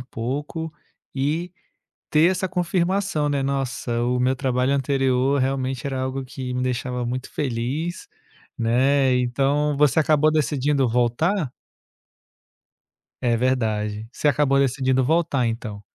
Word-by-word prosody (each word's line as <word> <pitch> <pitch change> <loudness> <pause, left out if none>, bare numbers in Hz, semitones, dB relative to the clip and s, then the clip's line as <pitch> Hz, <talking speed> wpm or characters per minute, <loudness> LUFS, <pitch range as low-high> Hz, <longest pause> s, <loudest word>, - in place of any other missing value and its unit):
pouco, 145 +7 -4 0.4
e 155 +6 -1 0.6
ter 160 +4 +5
essa 190 0 -1
confirmação, 180 -2 0
né: 140 -1 0
"Nossa, 135 -3 -2
o 125 +1 +1
meu 130 +1 +2
trabalho 130 0 0
anterior 135 0 +1
realmente 130 0 -1
era 135 -1 -2
algo 130 +1 -3
que 130 -1 -6
me 125 - -1
deixava 125 0 -2
muito 130 +1 -4
feliz", 145 - -3 0.5
né, 130 +3 +3
então 140 +4 +1
você 150 +2 +4
acabou 155 0 +3
decidindo 140 -2 +1
voltar? 125 - +1 1.7
É 120 -2 +2
verdade, 110 -4 -1
você 150 - +2
acabou 140 -1 +2
decidindo 130 -1 +2
voltar, 155 -3 +1
então? 110 -3 -4
135 Hz, 120 wpm, -23 LUFS, 125-150 Hz, 1.7 s, ter